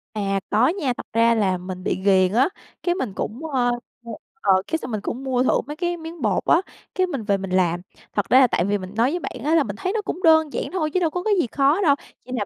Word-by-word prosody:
À, 195 -2 0
có 220 +4 +4
nha. 305 -8 0
Thật - - -7
ra 230 +1 +4
là 195 -4 +1
mình 185 0 -7
bị - - 0
ghiền 190 -2 +4
á, 260 - +4 0.3
cái 350 -1 +1
mình 255 - -3
cũng 240 - -4
ờ 255 -5 +1 0.7
ờ, 190 -2 +4
cái 320 - 0
xong 255 - -7
mình 215 -2 -2
cũng 250 +6 -5
mua 255 -1 +1
thử - - +2
mấy 295 - -5
cái 350 +1 -2
miếng 325 0 -9
bột 210 -5 +1
á, 340 - +4 0.3
cái 370 0 +2
mình 275 -10 -4
về 200 -2 +1
mình 195 -1 -6
làm. 175 -2 +1 0.3
Thật 205 - -1
ra 255 - +7
là 260 - +6
tại 175 - 0
vì 205 +1 +1
mình 185 0 -8
nói 235 +5 +2
với 350 - -2
bạn 250 -7 -7
á, 315 +3 +2
là 320 - +4
mình 205 -6 -5
thấy 370 - -3
nó 440 - 0
cũng 370 -2 -5
đơn 315 -3 +5
giản - - -1
thôi, 330 -4 -1
chứ 370 - +2
đâu 335 - +1
có 355 +3 -4
cái 430 - +2
gì 295 - +1
khó 280 - +2
đâu, 290 -6 +4 0.3
chỉ 255 - -11
là 220 -5 -1
255 Hz, 280 wpm, -22 LUFS, 205-320 Hz, 0.7 s, ra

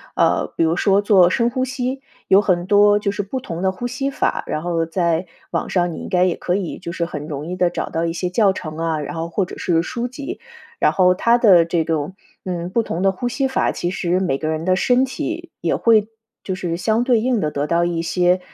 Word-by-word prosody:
呃， - - +2
比 - - +1
如 160 0 +2
说 200 0 +3
做 195 -4 +5
深 235 +5 +1
呼 255 +2 -1
吸， 255 +1 -3 0.3
有 195 - +7
很 180 -4 +1
多 205 +1 +5
就 205 -1 -1
是 205 +1 -3
不 255 +7 -5
同 170 -8 -6
的 190 0 +1
呼 215 +6 -6
吸 270 +3 -2
法， - - -1
然 155 - -2
后 170 -2 0
在 170 0 0 0.3
网 - - -2
上 175 -2 +1
你 160 - -7
应 - - -7
该 180 -1 +2
也 185 -2 +2
可 180 - -1
以 190 -3 -3
就 170 -1 -6
是 170 - -2
很 150 -3 -6
容 145 -1 -5
易 180 +2 -5
地 180 -1 +3
找 175 - -4
到 165 +1 -1
一 165 - -2
些 180 +1 -2
教 195 +1 +3
程 155 -4 -7
啊， 165 -2 -1
然 150 - -6
后 165 +1 -3
或 190 +3 -1
者 - - -10
是 165 -2 +1
书 235 +6 -3
籍。 275 +3 -7 0.4
然 - - +4
后 180 -1 +4
它 235 +6 +3
的 185 -8 +6
这 170 -1 0
种， 160 +3 -2 0.3
嗯， 175 -2 -3
不 230 +5 +1
同 175 -4 -4
的 195 0 +3
呼 220 +6 -4
吸 270 +3 0
法， 265 - +1
其 175 - -2
实 180 -1 0
每 135 -8 0
个 155 - -4
人 155 0 -2
的 185 +1 +2
身 250 +4 +3
体 330 +6 -4
也 165 - 0
会 220 -2 +3 0.4
就 190 - -3
是 175 -2 -3
相 220 +5 +1
对 245 -2 +3
应 240 -1 0
地 155 - 0
得 145 0 -2
到 170 +2 +2
一 170 -1 -1
些， 180 +2 +2
185 Hz, 270 characters per minute, -20 LUFS, 170-220 Hz, 0.4 s, 有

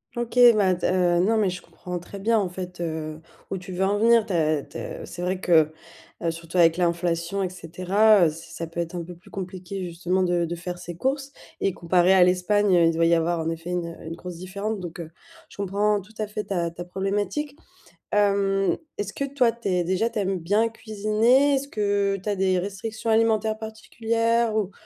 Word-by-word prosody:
OK, 240 +1 -4 0.2
bah, 190 -3 +3
tu 175 - -4
as, 180 -1 +2
heu, 175 - +3
non 220 +3 +2
mais 210 -3 +2
je 180 0 -6
comprends 180 0 -7
très 175 +3 -9
bien, 225 +3 +2
en 200 -3 +1
fait, 180 0 -7
heu, 155 -2 -4 0.3
où 195 - -2
tu 185 +1 -9
veux 185 +1 -1
en 200 +2 +2
venir. 230 0 +4
Tu 200 - -3
as 155 -3 +2
tu - - -10
as - - -7
c'est 175 - -7
vrai 180 +1 -1
que, 160 -4 +4 0.5
heu, 170 - 0
surtout 165 +2 -4
avec 165 -1 +5
l'inflation 170 +1 0
et 185 - -1
cetera. 185 +4 +3
Heu, - - +3
c'est 160 +2 -10
ça 165 - -5
peut 165 +1 -7
être 170 +1 -3
un 175 - -3
peu 175 +1 -9
plus 175 - -19
compliqué, 185 0 -6
justement, 175 +2 -1
de 175 -2 +1
de 170 - -4
faire 175 +1 -6
ses 175 -1 -8
courses. 270 - -2 0.3
Et 195 - +1
comparé 175 +2 +3
à 185 -1 +7
l'Espagne, 185 +2 +3
heu, 170 - +5
il 165 - +3
doit 165 +1 +2
y 170 - +5
avoir, 170 +1 0
en 160 0 -1
effet, 165 +1 -5
une 170 -2 -3
une 165 +1 -5
grosse 175 0 -8
différence, 200 +4 -4
donc, 175 -2 -7
heu, 165 -2 -6 0.4
je - - -16
comprends 200 +1 +1
tout 205 +3 -15
à 215 - -1
fait, 210 0 -4
ta 175 -5 -1
ta 170 +1 -8
problématique. 200 +10 -2 0.6
Hem, 200 -1 +2 0.2
est-ce 205 0 -4
que - - -3
toi, 250 -5 +3
tu 235 -3 -4
es 180 -2 +1
déjà 190 +6 +1
tu 220 - -3
aimes 195 -2 -1
bien 205 +7 +2
cuisiner? 225 +5 +2
Est-ce 275 +1 -3
que 200 -3 0
tu 195 - -11
as 205 - +1
des 185 -1 +2
restrictions 215 +4 -4
alimentaires 220 -1 +2
particulières, 230 +1 -1
ou 205 -3 -1
190 Hz, 220 wpm, -25 LUFS, 175-215 Hz, 0.6 s, à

